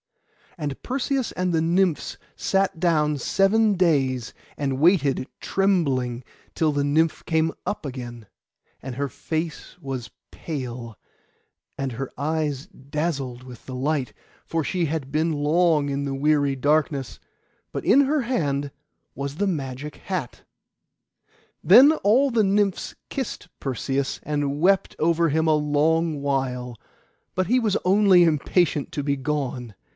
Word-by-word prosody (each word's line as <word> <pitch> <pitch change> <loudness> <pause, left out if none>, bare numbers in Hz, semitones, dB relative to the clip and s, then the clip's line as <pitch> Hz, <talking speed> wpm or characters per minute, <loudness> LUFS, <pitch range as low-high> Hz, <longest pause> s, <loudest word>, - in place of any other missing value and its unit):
And 145 -4 -4
Perseus 265 0 -1
and 180 -1 -1
the 160 - +2
Nymphs 175 0 +1 0.2
sat 195 -2 0
down 150 -4 +2
seven 205 - +3
days, 135 -9 +1 0.2
and 135 -2 -1
waited 145 -6 +3
trembling, 135 -11 0 0.3
till 160 -2 +2
the 145 0 0
Nymph 155 +3 +1
came 160 0 +1
up 205 - -3
again; 120 -4 -7 0.6
and 130 -2 -6
her 140 +2 -1
face 160 +6 -5
was 130 -6 -5 0.2
pale, 120 - -6 0.8
and 135 -2 -3
her 135 +3 -5
eyes 150 -2 -1
dazzled 140 -3 -4
with 125 -2 -12
the 130 - -6
light, 140 0 -1 0.3
for 165 - -2
she 180 +2 -1
had 150 -3 -3
been 160 +3 +1
long 155 0 +2
in 140 0 -2
the 135 -1 -3
dreary 145 -1 +2
darkness; 145 -1 0 0.5
but - - -5
in 280 - +6
her 285 +1 +2
hand 145 - -1 0.4
was 140 +1 -4
the 205 +5 0
magic 140 -4 -4
hat. 180 -11 -5 1.2
Then 260 - +8
all 250 +8 +4
the 225 -2 +3
Nymphs 200 -1 0
kissed 260 -8 -4
Perseus, 135 +1 -2
and 145 -1 -1
wept 190 +4 +2
over 165 +1 +2
him 160 +2 +1
a 155 - +4
long 150 +1 +1
while; 130 -3 -2 0.6
but 185 -1 0
he 250 +4 +3
was 215 -4 +1
only 190 -1 +6
impatient 160 -1 +1
to 145 - -2
be 140 0 +1
gone. 130 -5 -3
150 Hz, 135 wpm, -24 LUFS, 135-180 Hz, 1.2 s, Then